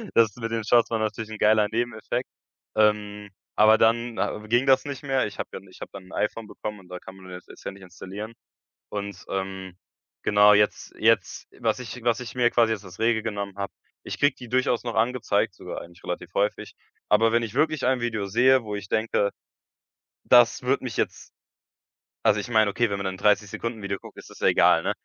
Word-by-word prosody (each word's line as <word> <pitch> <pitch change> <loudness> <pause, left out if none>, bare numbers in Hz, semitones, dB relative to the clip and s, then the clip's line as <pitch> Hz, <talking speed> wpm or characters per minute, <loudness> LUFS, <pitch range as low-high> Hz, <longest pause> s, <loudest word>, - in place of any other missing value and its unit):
das 110 -3 +4
mit 115 -2 -4
den 115 -1 -1
Shorts 115 +2 +4
war 115 - -1
natürlich 110 0 -3
'n 110 - -7
geiler 105 0 +4
Nebeneffekt. 115 -1 -2 0.5
Ähm, 105 -1 +1 0.3
aber 110 +1 +6
dann, 115 +1 +2
ah, - - -1
ging 120 +4 +2
das 135 -1 +4
nicht 140 -2 -6
mehr. 135 -4 +1
Ich 100 - -10
habe - - -4
dann 100 - -9
ich 95 - -17
habe - - -6
dann 95 -1 -9
'n 95 - -15
iPhone 105 +1 -2
bekommen 105 0 -7
und 90 -2 -18
da 90 0 -7
kann 95 - -12
man 95 -1 -13
das 90 0 -9
jetzt - - -14
ja - - -4
nicht 95 0 -14
installieren 95 +4 -8 0.6
und, 100 -2 -6
ähm, 95 -1 -4 0.5
genau 105 0 +6
jetzt 105 0 +1
jetzt, - - +2
was - - 0
ich 125 0 -8
was 120 0 +2
ich 125 -1 -8
mir 120 -1 +3
quasi 115 -2 +3
als 95 -4 -9
Regel 110 -1 +2
genommen 100 -3 -4
habe 100 0 -4 0.3
ich - - -6
kriege 145 -2 +3
die 125 -3 -11
durchaus 125 -1 +1
noch 120 -2 -4
angezeigt, 120 +2 +1
sogar - - -7
eigentlich 85 +1 -15
relativ 90 0 -5
häufig. 100 +1 -1 0.3
Aber 110 +2 +4
wenn 115 +1 +2
ich 110 -3 -5
wirklich 155 -2 +1
ein 130 0 +2
Video 110 -4 -2
sehe, 130 +6 +4
wo 105 -1 -6
ich 100 -2 -6
denke, 110 -2 +1 1.0
das 120 -1 +5
würde 130 +2 0
mich 125 - -5
jetzt - - -3 0.9
also, 105 - +3
ich 120 - -8
meine, 110 -3 +4
okay, 115 +3 +1
wenn 100 - -2
man 100 - -4
'n 95 - -3
30 105 +1 +2
Sekunden 115 +1 -5
Video 100 -1 -3
guckt, - - -14
ist - - -11
das - - -14
ja - - +2
egal, - - +5
ne? - - 0
110 Hz, 215 wpm, -25 LUFS, 100-120 Hz, 1.0 s, aber